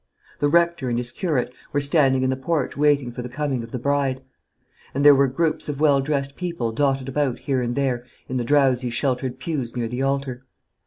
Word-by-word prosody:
The 145 - +2
rector 170 -3 +2
and 120 - 0
his 120 0 -1
curate 140 -9 -1 0.2
were 145 - +2
standing 140 -2 +3
in 130 - +2
the - - 0
porch 140 +1 -1
waiting 145 -3 +2
for 120 - -6
the 125 - -6
coming 135 -1 -2
of 115 - -8
the - - -3
bride; 135 0 0 0.7
and 140 +1 +1
there 145 - +10
were 140 0 +4
groups 155 +4 -1
of 145 -1 -4
well 145 -3 +4
dressed 140 -1 -2
people 170 -11 -3
dotted 135 +1 0
about 135 -2 0
here 135 -2 -1
and 120 0 -2
there 130 -3 0 0.2
in 130 - -2
the 125 - -1
drowsy 130 -2 +2
sheltered 130 +1 -1
pews 130 -4 -4
near 120 -1 -1
the 125 +3 -4
altar. 135 -2 -1
135 Hz, 210 wpm, -23 LUFS, 125-145 Hz, 0.7 s, there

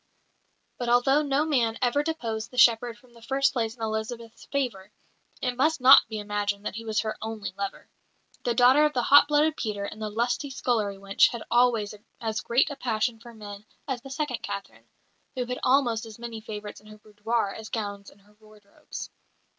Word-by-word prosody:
But 245 -1 -2
although 270 +4 +4
no 290 0 +1
man 240 -7 +1
ever 250 +3 +2
deposed 235 -9 -3
the 250 - -13
shepherd 235 -1 +4
from 240 +2 -23
the 235 - -17
first 270 +3 +1
place 225 -3 -1
in 230 - -8
Elizabeth's 220 +1 -5
favour, 235 -9 -3 0.5
it 250 -1 0
must 310 +5 +2
not 255 +2 +8
be 220 - -4
imagined 205 -1 -2
that - - -3
he 225 +2 -6
was 220 -1 0
her 215 -1 -3
only 220 -3 -5
lover. 200 0 -5 0.6
The 240 -1 0
daughter 260 +4 +6
of 300 - 0
the 245 - 0
hot 285 +3 +7
blooded 300 +1 +3
Peter 205 -6 -3
and 215 +2 -8
the 215 - -2
lusty 240 +6 -1
scullery 220 -6 -1
wench 195 0 +3
had 235 -2 -6
always 235 -4 +3 0.3
as 220 -2 -2
great 240 +5 +2
a - - -5
passion 225 -3 -1
for 235 +1 -12
men 205 -1 -9 0.2
as 260 -3 -3
the 270 - -11
second 270 -2 -3
Catherine, 200 -1 -7 0.5
who 250 -1 -2
had 250 +1 -4
almost 245 -4 +2
as 220 - -11
many 230 -2 -7
favourites 210 -2 -8
in 210 - -19
her 215 0 -12
boudoir 210 0 -2
as 220 -1 -8
gowns 205 -4 -4
in - - -21
her 205 +1 -25
wardrobes. 215 -2 -11
230 Hz, 195 wpm, -26 LUFS, 215-250 Hz, 0.6 s, not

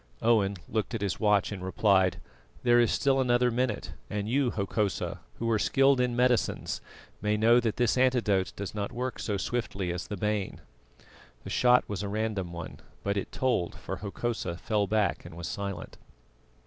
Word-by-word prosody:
Owen 105 -4 +3
looked 110 +1 -2
at 110 - -3
his 100 -3 -1
watch 105 -2 +3
and 95 -3 -5
replied: 95 -1 +2 0.4
"There 120 -1 +5
is 120 - +4
still 135 -1 +2
another 125 -1 +3
minute; 120 -2 -1 0.2
and 105 0 -2
you, 130 +2 +2
Hokosa, 100 -1 -1 0.2
who 115 - -2
are 110 - +2
skilled 135 +3 +4
in 125 -1 0
medicines, 125 -2 +1 0.4
may 105 0 +1
know 115 +3 +5
that 115 -3 -1
this 120 +1 +2
antidote 115 -7 +2
does 100 -1 -5
not 105 -1 -3
work 125 +1 -4
so 105 -2 -1
swiftly 95 -4 -2
as 90 - -5
the 105 - -5
bane." 105 0 -1 0.8
The - - -7
shot 125 0 +4
was 105 -2 -3
a 100 - -3
random 105 -4 -2
one, 85 -1 -7 0.2
but 100 0 0
it 100 - -3
told, 125 -10 0
for - - -6
Hokosa 105 -4 -3
fell 105 +1 0
back 105 0 +1
and 80 - -11
was 85 - -5
silent. 100 -2 -5
105 Hz, 175 wpm, -29 LUFS, 100-120 Hz, 0.8 s, There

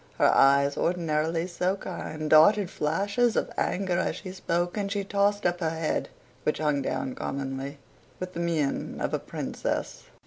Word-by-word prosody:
her - - +5
eyes, 140 +1 +5
ordinarily 165 -1 0
so 180 +1 -1
kind, 155 -5 -5
darted 185 +5 +6
flashes 200 +10 +1
of - - 0
anger 185 -2 0
as - - 0
she 185 - -7
spoke; 175 -1 -1
and 200 -2 -2
she 200 -1 -1
tossed 205 +1 +1
up 175 0 +1
her 165 -3 0
head 160 -1 -2 0.3
(which 150 - 0
hung 150 -2 +1
down 265 - -2
commonly) 135 - -4 0.4
with 185 0 -5
the - - -5
mien 165 -5 -1
of - - -2
a - - +1
princess. - - -4
170 Hz, 165 wpm, -27 LUFS, 155-195 Hz, 0.4 s, darted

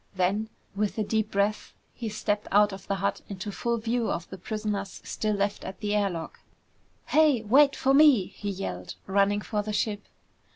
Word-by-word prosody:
Then, 195 +4 0 0.3
with 210 +1 -1
a 215 - +1
deep 220 0 0
breath, 200 +2 -1 0.2
he 230 -3 -5
stepped 210 0 -2
out 205 0 +5
of 195 0 -10
the 200 - 0
hut 195 +1 -1
into 200 +1 -5
full 235 +3 -1
view 230 +1 -1
of 170 - -3
the 190 - -6
prisoners 210 0 -3
still 215 -1 -1
left 200 0 -1
at 190 - -7
the 210 -1 -1
air 205 -1 +2
lock. 165 -3 -6 0.7
"Hey, 300 -7 +4
wait 275 +6 +5
for 270 - +2
me!" 275 -9 +6
he 205 - -6
yelled, 180 - -5
running 200 +1 +2
for 210 0 -2
the 210 +1 -4
ship. 205 0 -1
205 Hz, 190 wpm, -27 LUFS, 195-220 Hz, 0.7 s, me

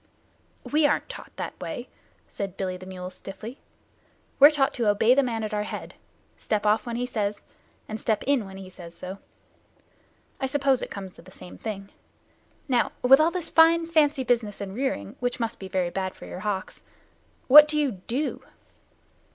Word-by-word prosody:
"We 300 0 +3
aren't 290 - -1
taught - - -9
that - - -6
way," - - -6 0.4
said 195 -2 -6
Billy 185 -2 -2
the 185 0 -10
mule 185 -1 -7
stiffly. 220 +7 -9 0.8
"We're 285 +2 +10
taught 290 -3 +1
to 235 -3 -1
obey 220 +4 +4
the 280 - +4
man 230 -4 -2
at 215 0 -4
our 210 - 0
head: 210 - -6 0.4
step 215 -1 -2
off 215 +3 +2
when 235 - -3
he 245 +1 -1
says 210 -4 -2
so, - - -25 0.4
and 215 0 -6
step 215 -2 0
in 265 -7 +1
when 190 0 -10
he 190 -1 -9
says 175 -2 -12
so. 185 +2 -8 1.2
I 265 - -1
suppose 270 -1 +1
it - - -5
comes 195 -2 -7
to - - -16
the 180 - -16
same 180 -1 -12
thing. 200 -3 -6 0.8
Now, 250 -3 +1
with 265 +2 +8
all 315 +2 +4
this 350 -1 -3
fine 330 +1 +6
fancy 305 -4 +2
business 230 -4 0
and 195 -1 -5
rearing, 215 - -3
which 245 +1 -2
must 230 -1 -3
be 190 - -7
very 185 -2 -1
bad 190 0 -3
for - - -11
your - - -7
hocks, 195 -1 -4 0.6
what 300 +3 +10
do 300 0 -1
you 290 -3 +1
do?" 235 +9 -3
220 Hz, 190 wpm, -26 LUFS, 195-270 Hz, 1.2 s, We're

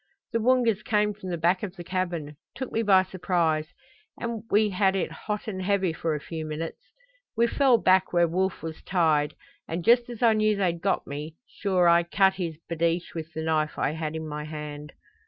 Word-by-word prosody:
"The 230 - +2
Woongas 230 -3 +3
came 210 -1 +1
from 195 -2 -8
the 175 - -2
back 175 +3 +2
of 195 -3 -5
the 175 - -8
cabin 175 -5 -3 0.2
took 260 +1 -5
me 225 - 0
by 195 -4 +5
surprise 170 -4 0 0.5
and 235 -2 -3
we 210 0 +3
had 190 0 +2
it 190 - -1
hot 210 0 -5
and 190 -3 -4
heavy 190 -2 +1
for 160 +1 -1
a - - -3
few 160 +2 -6
minutes. 155 - -6 0.5
We 235 - +5
fell 255 0 +4
back 190 -2 +3
where 175 -1 +4
Wolf 185 +1 -1
was 160 -1 -6
tied 155 -5 +1 0.3
and 165 +1 -4
just 240 +1 +5
as 240 -1 -5
I 230 -2 +6
knew 215 0 +2
they'd 175 -4 0
got 195 - 0
me 150 +3 -6
sure 185 -4 +1
I 170 0 +6
cut 190 +3 +3
his 170 -5 -4
babeesh 170 +1 -1
with 165 0 -6
the 160 - -3
knife 155 -1 0
I - - +1
had 160 0 -4
in 160 0 -4
my 150 0 -5
hand." 150 -1 -7
180 Hz, 205 wpm, -26 LUFS, 160-205 Hz, 0.5 s, I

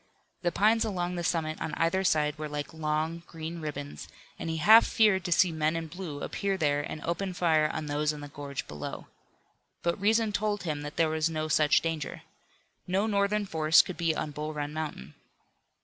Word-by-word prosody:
The 175 - +1
pines 220 +5 +3
along 180 -5 -2
the 175 -1 -3
summit 160 -2 -1
on 155 - -3
either 170 +4 +1
side 150 -4 +1
were 155 -1 -4
like 145 0 -5
long, 160 +1 -1
green 165 +1 -6
ribbons, 145 -2 -6 0.3
and - - -4
he 160 - -2
half 220 +8 +8
feared 210 -4 +3
to 175 - -2
see 175 +1 +4
men 155 0 0
in 165 0 -2
blue 160 -3 -7
appear 195 -1 -1
there 145 -3 +1
and 150 +1 -6
open 180 +2 -2
fire 160 -3 +3
on 155 0 -4
those 150 +1 0
in 150 - -7
the 145 - -7
gorge 140 -1 -6
below. 75 -1 -7 0.7
But 170 +2 -1
reason 220 +1 +3
told 205 -1 -1
him 150 -4 -2
that 145 0 -7
there 165 -2 +2
was 155 +1 +1
no 155 -1 -2
such 150 -1 +4
danger. 160 -3 -4 0.6
No 190 +3 +1
Northern 205 0 +1
force 160 -3 +5
could 185 - -7
be 165 -2 +1
on 150 - -3
Bull 150 +1 -5
Run 145 0 -3
Mountain. 155 - -5
160 Hz, 195 wpm, -29 LUFS, 150-185 Hz, 0.7 s, half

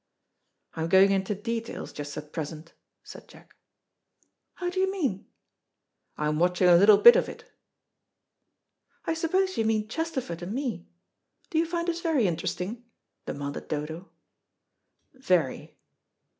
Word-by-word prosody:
"I'm 160 0 -3
going 190 +2 +6
into 195 +1 0
details, 230 +2 -5
just 145 0 -7
at 150 0 -8
present," 160 0 -6 0.3
said - - -12
Jack. - - -18 1.0
"How 355 -1 -3
do 375 - -3
you 380 0 +2
mean?" 275 - -2 0.9
"I'm 150 0 -1
watching 180 +1 +3
a 175 - +7
little 200 +4 +7
bit 235 +4 +9
of - - +1
it." - - -11 1.6
"I - - 0
suppose 370 +3 0
you - - +3
mean 215 -1 0
Chesterford 260 - -4
and 180 +4 -5
me. 260 -2 -4 0.6
Do 320 - +2
you 330 - +1
find 340 0 -2
us 340 0 -2
very 315 -9 +1
interesting?" 185 +6 -3 0.4
demanded 140 0 -5
Dodo. 160 +4 -5 1.0
"Very." 180 - -1
205 Hz, 130 wpm, -27 LUFS, -, 1.6 s, bit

